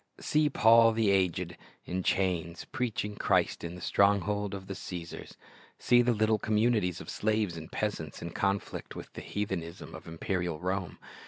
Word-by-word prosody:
See 150 0 +2
"Paul 115 -3 +6
the 110 -2 +2
aged," 90 -2 +1 0.3
in 95 +1 -2
chains, 85 -3 0
preaching 110 -4 -2
Christ - - +1
in 85 +1 -5
the 90 - -10
stronghold 100 +1 +2
of 95 -1 -7
the 95 - -5
Caesars. 85 -3 -7 0.4
See 120 0 +5
the 120 0 +3
little 110 -1 +2
communities 105 -4 +1
of - - -10
slaves 105 -4 0
and 80 -1 -8
peasants 90 -8 -3
in 85 - -6
conflict 100 +2 -2
with - - -9
the - - -7
heathenism 95 -4 -4
of - - -10
imperial 85 -1 -2
Rome. 95 0 -2
100 Hz, 160 wpm, -30 LUFS, 90-110 Hz, 0.4 s, Paul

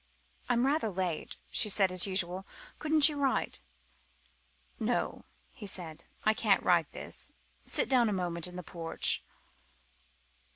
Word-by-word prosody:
"I'm 245 0 +2
rather 275 -5 +1
late," 180 -4 -4
she 210 - +2
said, 195 -2 +4
as 185 +1 +5
usual; 185 0 -1 0.3
"couldn't 310 -1 +5
you 300 -2 -3
write?" 275 -2 -1 1.2
"No," - - -2 0.3
he 215 -6 -9
said, 170 -5 0 0.2
"I 215 - +4
can't 210 -3 +2
write 170 -4 +2
this. - - -2 0.3
Sit - - +5
down 245 -3 +3
a - - -1
moment 175 -3 -1
in 180 - -10
the 180 - -6
porch." 165 -1 -1
190 Hz, 135 wpm, -30 LUFS, 180-240 Hz, 1.2 s, as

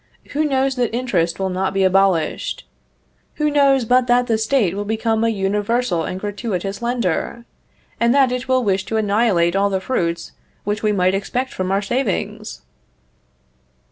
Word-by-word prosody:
Who 300 +2 0
knows 270 -2 0
that 240 -2 0
interest 185 -10 0
will 190 -1 -2
not 190 +1 -2
be 195 - +2
abolished? 190 -3 +1 0.7
Who 300 -1 0
knows 275 -3 +3
but 250 +2 +3
that 245 0 +3
the 225 -2 0
State 220 -5 +1
will 205 +1 -3
become 220 +1 0
a 230 - +3
universal 205 -2 0
and 185 - -4
gratuitous 200 -1 -4
lender, 235 -1 -2 0.5
and 235 0 +3
that 270 -1 +4
it 250 -1 -3
will 260 -1 +2
wish 195 -3 +1
to 225 - -2
annihilate 200 -5 +2
all 200 +1 +2
the 190 -1 0
fruits 170 -6 -2 0.3
which 210 +1 -2
we 215 - +1
might 185 -2 +2
expect 245 +7 -2
from 185 0 -2
our 200 +1 +1
savings?" 200 - -3
210 Hz, 165 wpm, -20 LUFS, 190-245 Hz, 0.7 s, that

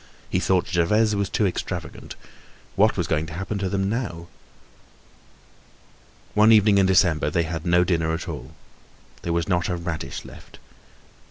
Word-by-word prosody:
He 90 - +1
thought 95 -1 +1
Gervaise 105 +5 +2
was 100 -1 -1
too 105 - +1
extravagant. 90 - -5 0.6
What 105 +3 +3
was 85 - 0
going 80 -1 -1
to 80 - -8
happen 95 +3 -4
to 95 -1 -1
them 95 0 -1
now? 100 -7 -4 2.0
One 105 +1 +5
evening 105 -2 +5
in 95 - +4
December 90 -5 +3
they 85 +3 +1
had 80 +1 -5
no 90 +1 +4
dinner 80 -3 0
at 80 +3 -4
all. 75 -2 -7 0.7
There 85 - -3
was 85 -1 0
not 90 -2 0
a 90 - -1
radish 80 -6 -5
left. - - -14
90 Hz, 160 wpm, -23 LUFS, 85-100 Hz, 2.0 s, One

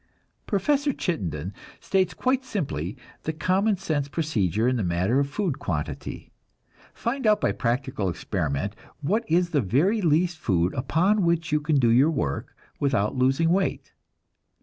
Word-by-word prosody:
Professor 285 +8 +1
Chittenden 95 - -3 0.3
states 190 -2 0
quite 260 +1 +1
simply 135 - -3 0.2
the 160 - -2
common 190 +6 +1
sense 155 -7 -1
procedure 115 - 0
in 130 - +2
the 115 - -1
matter 90 +8 +1
of 140 0 0
food 155 -2 -2
quantity. 75 - -4 0.6
Find 245 0 -2
out 210 -1 +5
by - - +1
practical 120 -4 -1
experiment 90 0 -2 0.3
what 205 +11 +1
is 175 +2 +2
the 145 -4 +2
very 155 - +2
least 170 0 +2
food 90 -3 +1
upon 180 +10 +2
which 170 -1 +1
you 150 0 +2
can 150 +1 +1
do 125 -4 +4
your 130 +6 +5
work 70 - -3 0.2
without 130 -7 +1
losing 135 +6 +2
weight. 190 +1 0
145 Hz, 150 wpm, -25 LUFS, -, 0.6 s, out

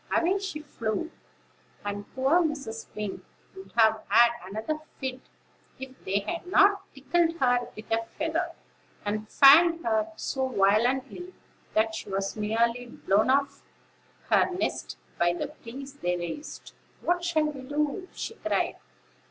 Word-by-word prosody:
Away 365 +4 +2
she 390 -6 -5
flew; 260 +1 -3 0.7
and 205 0 -5
poor 270 +6 +4
Mrs. 280 -9 -3
Wing 210 -2 -4 0.3
would 385 0 -11
have 220 -1 +4
had 235 0 +6
another 220 +11 -4 0.2
fit, 260 -1 -4 0.6
if 265 0 -7
they 200 +2 +1
hadn't 365 - +3 0.2
tickled 330 +4 +1
her 245 -4 +2
with 215 - -9
a 225 0 +2
feather, 330 +2 -1 0.5
and 215 +1 -2
fanned 330 +5 +7
her 330 -1 +1
so 265 -4 -2
violently 250 - +1 0.4
that 220 +1 +3
she - - -6
was 195 0 -2
nearly 230 +3 0
blown 215 0 +1
off 275 +1 +1 0.7
her - - +5
nest 365 0 -3 0.2
by 175 0 +3
the 225 +11 -4
breeze 270 +4 -8
they 180 -10 -1
raised. 175 - -7 0.3
"What 350 0 0
shall 325 -3 +2
we 295 -3 -4
do?" 295 +7 -2
she - - -5
cried. - - -1
265 Hz, 135 wpm, -27 LUFS, 220-330 Hz, 0.7 s, fanned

